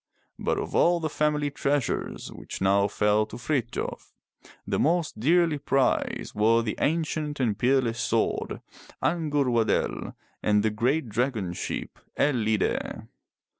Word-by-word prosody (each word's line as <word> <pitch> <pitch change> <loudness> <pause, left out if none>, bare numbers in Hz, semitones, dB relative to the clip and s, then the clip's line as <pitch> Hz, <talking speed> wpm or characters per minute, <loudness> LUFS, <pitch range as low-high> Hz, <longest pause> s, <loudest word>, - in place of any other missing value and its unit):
But - - 0
of - - -4
all 175 0 +4
the 155 -2 -3
family 150 -1 +1
treasures 140 -2 -1
which - - -8
now 100 +1 +3
fell 105 +1 +2
to 110 - -8
Frith 120 -1 -1
j - - -3
of, - - -7 0.5
the - - -1
most 165 -5 +1
dearly 165 +3 +3
prized 135 -1 0
were 115 +2 +3
the 110 - -2
ancient 155 -2 -1
and 115 -6 +1
peerless 120 0 +1
sword, 115 -1 -1 0.4
Ang'ur 145 -6 +1
wa'del, 115 -2 0 0.3
and 105 -1 +3
the 110 - +2
great 125 +7 0
dragon 110 -5 -1
ship, - - -5 0.2
El 145 - +3
lide'. 110 -3 -1
125 Hz, 140 wpm, -26 LUFS, 110-150 Hz, 0.5 s, all